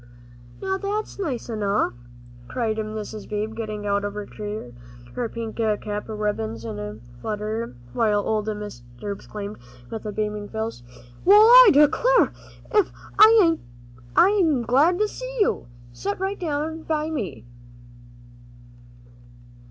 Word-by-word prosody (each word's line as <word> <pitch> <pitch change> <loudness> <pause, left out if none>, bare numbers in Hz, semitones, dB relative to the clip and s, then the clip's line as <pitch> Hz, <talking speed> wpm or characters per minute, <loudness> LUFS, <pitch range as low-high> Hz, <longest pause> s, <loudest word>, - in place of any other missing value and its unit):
"Now 385 0 -1
that's 410 +1 -3
nice 280 - -3
enough," 210 - 0 0.5
cried 225 -3 -1
Mrs. 215 -1 -5
Beebe, 210 +1 -2
getting 215 -2 -5
out 200 0 +1
of 205 0 -4
her 210 -1 -4
chair, 210 - -6 0.4
her 240 -2 -2
pink 225 -1 -6
cap 210 -2 -1
ribbons 160 - -3
all 115 - -4
in 105 - -6
a 105 +1 -6 0.2
flutter, 215 - -3 0.2
while 210 -3 +2
old 215 -1 0
Mr. 210 - -5 0.2
Beebe 205 - -4
exclaimed, 205 +1 -7 0.3
with 225 - -5
a - - -2
beaming 210 0 -3
face, 220 - -4 0.4
"Well, 410 +3 +8
I - - +10
declare! 315 - +4 0.4
ef 420 -5 +3 0.3
I 420 -7 +7 0.6
ain't 345 - +4
glad 290 +9 +4
to 425 +2 +2
see - - -7
you. 405 - +1 0.3
Set 120 +12 -3
right 385 +1 -2
down 315 -1 -2
by 315 0 -2
me." 195 - -4
220 Hz, 135 wpm, -24 LUFS, 210-325 Hz, 0.6 s, I